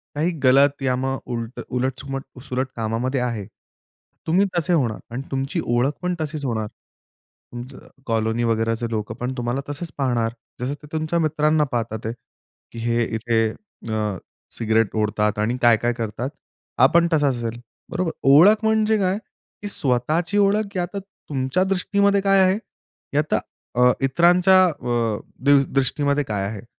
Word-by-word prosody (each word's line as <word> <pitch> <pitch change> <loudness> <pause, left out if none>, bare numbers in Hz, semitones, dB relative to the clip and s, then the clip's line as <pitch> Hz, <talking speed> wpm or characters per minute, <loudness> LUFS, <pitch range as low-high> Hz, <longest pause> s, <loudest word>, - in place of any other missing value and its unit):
काही 160 +4 +1
गलत 140 +2 +4
या 130 -1 +2
मग 135 +1 -1
उलटं 115 +1 -4 0.2
उलट-सुलट- 135 +1 -3 0.2
सुलट 130 -1 -2
कामामध्ये 115 +4 -1
आहे, 115 -5 -2 0.8
तुम्ही 180 +5 +4
तसे 175 +1 +1
होणार 125 -10 +1
आणि 120 +3 -4
तुमची 135 +5 -2
ओळख 120 +4 +2
पण 180 0 -1
तशीच 155 -1 -4
होणार. 110 -4 -1 0.8
तुमचं 125 +2 -9 0.2
कॉलोनी 115 0 0
वगैरेचे 115 0 0
लोकं 110 0 -3
पण 125 +2 -3
तुम्हाला 120 +2 -1
तसेच 145 +2 -4
पाहणार. 120 -4 0 0.3
जसं 130 +3 -1
ते 150 +1 -12
तुमच्या 155 +2 0
मित्रांना 155 -1 +2
पाहतात 115 -2 -3
आहेत, 115 +1 -3 0.6
की 115 - -8
हे 115 +1 +1
इथे 115 -1 +1
अ, 110 - -5 0.4
सिगारेट 110 -1 +1
ओढतात 105 0 0
आणि 115 +4 0
काय-काय 120 0 +4
करतात. 115 +2 -4 0.5
हा 125 - +8
पण 170 0 +5
तसा 145 -2 +3
असेल, 120 -3 -2 0.3
बरोबर? 175 -2 -1 0.2
ओळख 195 +11 +7
म्हणजे 220 0 +3
काय, 190 0 +1 0.4
की 205 - -4
स्वतःची 155 +7 0
ओळख 205 0 +2
या 175 - +1
तर 200 - -2 0.3
तुमच्या 135 +5 0
दृष्टीमध्ये 200 +1 +2
काय 195 0 +4
आहे, 185 +1 +3 0.6
या 150 - +5
तर - - +4 0.5
अ, 125 - +7
इतरांच्या 180 +6 +5
अ, 120 -8 -1 0.3
दृ 140 -1 +6
दृष्टीमध्ये 140 +1 +1
काय 105 -6 -2
आहे? 105 +1 -7
130 Hz, 150 wpm, -22 LUFS, 115-160 Hz, 0.8 s, हा